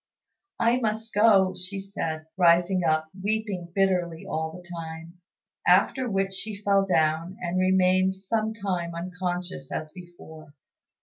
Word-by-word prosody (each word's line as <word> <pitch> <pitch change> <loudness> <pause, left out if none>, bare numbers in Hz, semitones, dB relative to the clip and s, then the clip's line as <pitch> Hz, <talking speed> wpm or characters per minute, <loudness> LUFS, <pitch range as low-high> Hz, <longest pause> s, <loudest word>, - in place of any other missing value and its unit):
"I 235 +2 +3
must 220 -1 -2
go," 200 -3 +5
said 185 -3 -5
she, - - -32
rising 175 +1 +4
up 155 -1 +1
and 190 - -12
weeping 205 -5 -2
bitterly 180 -4 +1
all 160 0 -3
the 175 +1 -12
time; 165 0 -8 0.5
after 260 -2 +4
which 195 -1 0
she 210 +2 -5
fell 195 -1 +3
down, 160 +1 +1
and 180 +1 -1
remained 185 0 +3
some 215 +3 -1
time 185 -6 -3
unconscious 180 -4 -4
as 155 -1 -4
before. 160 -4 -13
185 Hz, 135 wpm, -26 LUFS, 170-195 Hz, 0.5 s, go